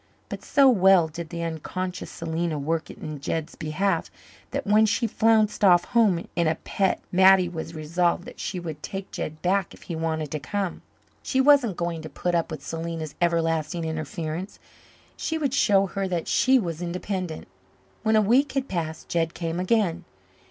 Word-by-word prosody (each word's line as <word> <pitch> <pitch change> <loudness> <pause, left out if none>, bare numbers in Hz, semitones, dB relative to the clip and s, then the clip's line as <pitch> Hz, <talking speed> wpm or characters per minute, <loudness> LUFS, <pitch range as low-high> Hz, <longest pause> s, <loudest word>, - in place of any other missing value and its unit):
But - - -6
so 280 -2 +4
well 190 -7 +5
did 165 +1 -7
the 170 -1 -4
unconscious 180 +3 -4
Selena 165 -1 -3
work 160 +3 -2
in 155 -3 -7
Jed's 160 +2 -3
behalf 165 +3 -1 0.4
that 280 -1 -3
when 215 +1 +5
she 210 +3 +1
flounced 220 -1 +2
off 175 -3 +6
home 205 -7 +2
in 170 -2 +2
a 160 - +2
pet 190 +4 -1
Mattie 190 0 +6
was 165 -1 -6
resolved 170 +3 0
that - - -11
she 185 - -3
would 160 -3 -6
take 195 +4 -6
Jed 155 +1 -5
back 190 +1 +1
if - - -17
he 170 - -5
wanted 160 -2 -2
to 155 - -2
come. 190 +6 -3 0.4
She 265 - -1
wasn't 265 -8 +5
going 170 -1 -2
to 155 - -8
put 175 +2 -2
up 170 -1 +1
with 150 -3 -7
Selena's 165 -2 -4
everlasting 165 -1 0
interference. 160 +3 -4 0.6
She 320 - -2
would 285 -5 -1
show 200 -7 +4
her 195 +1 -3
that 175 -3 -2
she 265 0 +4
was 170 -8 -3
independent. 180 -1 -4 0.5
When 220 0 +2
a 215 - +6
week 250 +7 +3
had 270 -1 -1
passed 160 -3 -4
Jed 165 -1 -1
came 165 0 -3
again. 180 -3 +1
175 Hz, 175 wpm, -25 LUFS, 160-200 Hz, 0.6 s, off